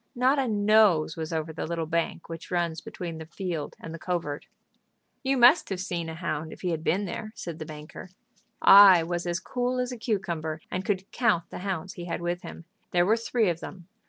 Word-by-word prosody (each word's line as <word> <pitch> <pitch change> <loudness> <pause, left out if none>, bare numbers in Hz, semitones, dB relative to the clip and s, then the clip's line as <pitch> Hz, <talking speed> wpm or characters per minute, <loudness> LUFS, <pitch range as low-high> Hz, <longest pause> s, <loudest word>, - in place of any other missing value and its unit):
Not 260 +3 +3
a 265 - +1
nose 205 -7 +4
was 160 0 -5
over 160 0 -3
the 160 - -4
little 165 -1 -2
bank 170 +1 -2
which 165 0 -8
runs 170 -2 -1
between 180 -7 -7
the 160 - -8
field 170 -4 -4
and 165 - -8
the 165 - -7
covert." 165 -5 -3 0.7
"You 270 0 +1
must 250 +7 +6
have 190 -2 -3
seen 175 -3 -3
a 160 - -6
hound 160 -2 -3
if - - -11
he 180 - -1
had 160 -1 -3
been 195 +6 +1
there," 215 +4 -5
said 170 -5 -7
the 155 - -6
banker. 155 +4 -9 0.5
"I 195 -4 +9
was 175 +1 -3
as 175 0 -1
cool 250 +3 -2
as 250 0 -1
a 250 - -6
cucumber, 170 -8 -2
and 185 - -2
could 190 -1 -1
count 215 -9 +1
the - - -6
hounds 185 -2 -4
he 175 - -7
had 175 - -3
with 175 +1 -2
him. 165 - -10 0.2
There 175 0 +3
were 215 +4 +4
three 230 -1 0
of 170 -2 0
them. 175 -2 -9
175 Hz, 215 wpm, -27 LUFS, 165-205 Hz, 0.7 s, I